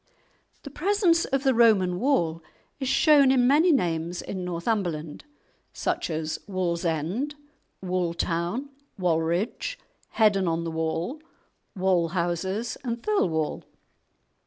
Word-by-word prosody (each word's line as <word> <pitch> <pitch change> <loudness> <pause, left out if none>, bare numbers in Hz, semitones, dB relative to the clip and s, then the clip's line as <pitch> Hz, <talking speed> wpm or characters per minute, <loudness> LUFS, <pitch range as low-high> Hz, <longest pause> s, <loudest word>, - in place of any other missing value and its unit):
The 280 - -9
presence 350 +1 +2
of 270 0 -1
the 265 -2 +3
Roman 200 -7 +4
wall 170 - +1 0.4
is 265 -2 -2
shown 290 -3 +5
in 260 -2 +4
many 305 +7 +5
names 175 - 0
in 185 -2 -5
Northumberland, 175 - -3 0.5
such - - -2
as 155 -1 -3
"Wallsend," 180 - -1 0.5
"Walltown," 175 - -1 0.3
"Wallridge," 175 - -1 0.4
"Heddon 205 -4 +3
on 165 0 0
the 165 - -3
Wall," 160 - -3 0.6
"Wallhouses," 185 +3 0
and 235 -2 -4
"Thirlwall." 165 - 0
185 Hz, 105 wpm, -26 LUFS, 170-260 Hz, 0.6 s, shown